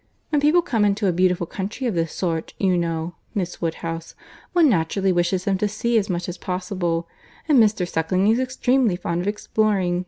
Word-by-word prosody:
When 295 -2 +1
people 315 +4 +4
come 230 -10 +1
into 205 +1 +1
a 190 - +3
beautiful 180 0 +1
country 200 +9 -5
of 235 - 0
this 165 -2 -1
sort, 165 -3 -3
you 190 -2 +2
know, 165 -1 -2 0.2
Miss 180 -4 -3
Woodhouse, 165 0 -4 0.4
one 340 -3 +5
naturally 190 - +1
wishes 180 +1 0
them 195 -2 +1
to 210 - +1
see 225 +3 -1
as 205 0 -4
much 175 -1 -2
as 180 0 -6
possible; 180 -3 -2 0.4
and 295 -5 +5
Mr. 210 -5 +3
Suckling 180 +4 0
is 225 +3 +3
extremely 255 -4 +1
fond 175 -1 -2
of 185 - -4
exploring. 205 -4 0
185 Hz, 190 wpm, -22 LUFS, 175-215 Hz, 0.4 s, one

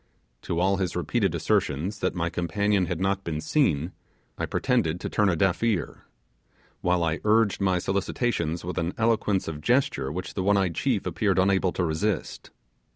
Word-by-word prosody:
To 85 - -2
all 95 +2 +2
his 95 -2 -2
repeated - - 0
assertions, 85 +9 0
that - - -1
my 85 -1 -1
companion 95 +2 0
had - - -3
not 95 +1 0
been 80 -4 -3
seen, 80 - +1 0.4
I - - -3
pretended 95 -10 0
to - - -4
turn 105 -2 +3
a 90 - +1
deaf 90 +1 +1
ear, 110 -7 -1 0.8
while 90 -1 +1
I 80 0 0
urged 105 -1 +3
my 95 -2 +2
solicitations 90 -3 -1
with 90 - -3
an 85 +2 -2
eloquence 110 -4 +1
of 75 -2 -5
gesture 120 - +1
which 90 +4 -5
the 95 - -2
one 100 +2 +3
eyed 95 -3 +1
chief - - 0
appeared 100 -3 0
unable 95 -1 +3
to 90 - -1
resist. 85 +6 -2
95 Hz, 175 wpm, -26 LUFS, 85-100 Hz, 0.8 s, turn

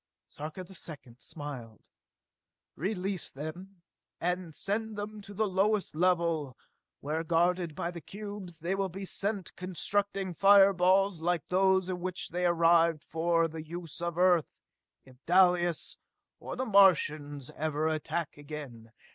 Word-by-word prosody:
Sarka 155 +5 -7
the 180 - -14
Second 145 -9 -9
smiled. 130 -9 -8 0.9
"Release 190 0 -2
them 170 +6 -8 0.4
and 180 -2 -2
send 215 +1 -2
them 210 +1 -5
to 200 - -12
the 215 +2 0
lowest 195 -1 +1
level 165 -6 +1 0.4
where, 155 +3 -2
guarded 170 0 +1
by 170 - -2
the 170 -1 -8
cubes, 200 -4 -8
they 175 +3 -1
will 195 0 -1
be 195 +3 -6
set 200 0 -2
to - - -10
constructing 195 +1 -2
fireballs 195 -1 +5
like 175 -1 0
those 190 0 +3
in 185 -1 -3
which 185 0 -4
they 180 +1 0
arrived 165 -2 +4
for 165 0 +1
the 160 0 -7
use 170 0 -6
of 170 -1 -3
Earth 180 -3 +2 0.4
if 130 0 -19
Dalis, 175 -1 +3 0.4
or - - -6
the 260 - -2
Martians, 155 - +3
ever 155 0 -1
attack 160 0 -2
again! 140 -7 -9
175 Hz, 140 wpm, -30 LUFS, 160-190 Hz, 0.9 s, fireballs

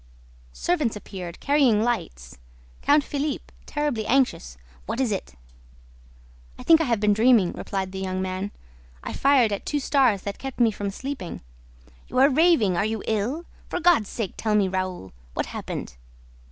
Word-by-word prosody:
Servants 300 - 0
appeared, 185 -4 -8
carrying 270 -7 +3
lights; 65 - -3 0.4
Count 290 +1 +4
Philippe, 290 +1 -3
terribly 290 -8 -2
anxious: 245 - +1 0.3
"What - - -3
is 255 -4 +1
it?" 190 - -4 1.2
"I - - -9
think 325 -1 +6
I - - +1
have 235 -5 +1
been 210 0 +3
dreaming," 220 -4 +4
replied 190 -1 -4
the 190 - -6
young 185 -1 -2
man. 185 +2 -3 0.5
"I - - -5
fired 270 -5 +4
at 200 - -4
two 295 - -1
stars 260 -8 +2
that 200 -1 -5
kept 270 -1 -7
me 235 -2 +4
from 205 -1 -4
sleeping." 255 -2 -6 0.7
"You're 265 +2 +4
raving! 275 - +4
Are 175 - +2
you 220 -1 -2
ill? 235 +10 -1 0.2
For - - -2
God's 330 - +4
sake, 215 -6 -4
tell 215 -1 0
me, 205 -2 +3
Raoul: 185 - -4 0.2
what - - 0
happened?" - - -6
220 Hz, 160 wpm, -25 LUFS, 190-275 Hz, 1.2 s, think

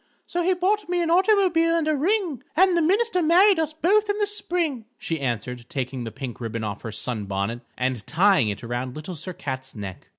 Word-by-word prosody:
So 350 - -2
he 365 +2 +2
bought 385 +3 0
me 355 0 +1
an 330 - 0
automobile 360 -3 +4
and 325 -2 0
a 310 - +2
ring, 340 - 0
And 370 +2 +5
the 340 - +3
minister 385 +3 +2
married 360 +3 +5
us 315 -1 0
both 405 +7 +2
in 410 - +1
the 420 - +2
spring,_" 345 - -2
she 165 -1 -3
answered, 120 -1 -3
taking 130 -2 -3
the 115 - -5
pink 125 -1 -7
ribbon 115 -1 -4
off 105 -1 -4
her 110 - -6
sun 110 0 -4
bonnet 100 +5 -2 0.2
and 125 -3 -1
tying 175 - +4
it 105 +3 -5
around 120 +2 -4
Little 155 +4 -6
Sir 175 +3 -7
Cat's 130 -4 -6
neck. 100 -3 -8
225 Hz, 210 wpm, -24 LUFS, -, 0.2 s, And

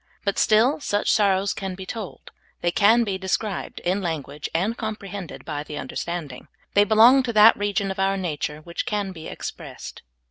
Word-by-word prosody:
But 200 - 0
still 230 +8 +4
such 205 -7 0
sorrows 200 -2 +2
can 190 -1 -5
be 190 0 -8
told; 210 0 -7 0.3
they 175 - +1
can 220 +5 +4
be 195 -4 -3
described 195 +2 -3
in 185 +3 0
language 150 -4 -4
and 195 +8 0
comprehended 205 -5 -6
by 150 -2 -4
the 150 0 -8
understanding. 160 -8 -5 0.3
They 205 0 +5
belong 230 +5 +6
to 245 -2 -3
that 215 +1 +8
region 200 -1 -1
of 190 - -6
our 195 0 +1
nature 155 -4 -3
which 170 +2 -5
can 205 -2 -1
be 160 -3 -9
expressed. - - -8
195 Hz, 175 wpm, -24 LUFS, 175-215 Hz, 0.3 s, that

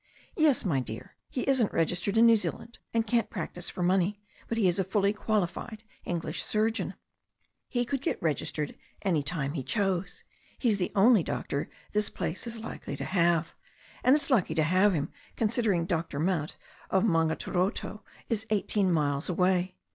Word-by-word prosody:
"Yes, 310 -8 +3
my 150 -8 +2
dear. 110 -3 -7
He 255 - -3
isn't 260 -6 +3
registered 180 +5 0
in 230 - +7
New 230 0 +8
Zealand, 230 +2 -4
and 230 -1 +1
can't 230 +1 +1
practise 175 -2 -5
for 180 - -3
money, 190 +3 +2 0.3
but 230 - -2
he 210 -5 +4
is 180 +2 +1
a - - +3
fully 200 +2 +1
qualified 215 +1 -2 0.2
English 170 -2 -2
surgeon. 220 +1 0 0.7
He 245 -1 0
could 270 +1 -2
get - - -1
registered 150 -1 -2 0.3
any 175 -7 +2
time 145 -2 -2
he 150 - -2
chose. 195 - -1 0.3
He's 220 -6 +1
the 180 - -1
only 215 +1 +6
doctor 140 -2 -3 0.2
this 210 0 +1
place 190 - -4
is 230 -1 -6
likely 225 - -6
to - - -4
have. 170 -3 +2 0.5
And 260 - +6
it's 300 -1 0
lucky 185 -10 +3
to 160 - +3
have 185 +5 +4
him, 145 -1 -2 0.2
considering 215 -6 +1
Dr. 165 -5 -2
Mount, 165 -2 0 0.3
of 190 - +3
Maungaturoto, 180 +3 0 0.3
is 225 -1 -2
eighteen 205 -2 +1
miles 145 -2 +1
away." 180 +1 +1
190 Hz, 165 wpm, -29 LUFS, 170-220 Hz, 0.7 s, New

